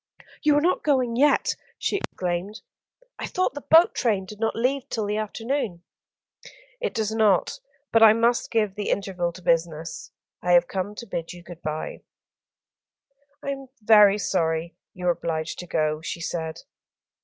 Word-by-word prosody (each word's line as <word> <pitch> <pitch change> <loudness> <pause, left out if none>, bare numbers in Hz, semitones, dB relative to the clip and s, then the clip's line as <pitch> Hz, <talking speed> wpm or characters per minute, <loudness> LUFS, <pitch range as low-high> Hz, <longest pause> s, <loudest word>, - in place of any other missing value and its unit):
"You 300 -1 +4
are 295 - +4
not 355 +4 +2
going 255 -5 +1
yet," 290 +4 +3 0.2
she - - -1
exclaimed. 185 - -4 0.6
"I - - -3
thought 370 -5 0
the 290 - -7
boat 320 +4 +6
train 210 -6 0
did 210 +2 -11
not 225 0 0
leave 255 +3 -1
till 220 -2 -2
the 210 +1 -1
afternoon." 215 -3 -3 1.0
"It 475 - -3
does 220 -1 0
not; 215 -4 +2 0.3
but 225 - +4
I 220 -1 +9
must 235 +2 +1
give 215 -4 +1
the 205 0 -4
interval 185 -3 -1
to 180 - -13
business. 165 - -1 0.3
I 180 - +2
have 175 0 +5
come 195 +2 -3
to 235 - -7
bid 165 -6 -5
you 175 -1 -12
good 175 -1 -11
bye." 155 0 -4 1.4
"I 280 - -2
am 270 -1 -6
very 210 -2 +6
sorry 165 -4 -1 0.2
you 180 -1 -6
are 175 - +5
obliged 160 -2 -3
to 180 - -7
go," 155 -2 0
she 170 - -5
said. 165 -1 -4
205 Hz, 165 wpm, -25 LUFS, 175-235 Hz, 1.4 s, I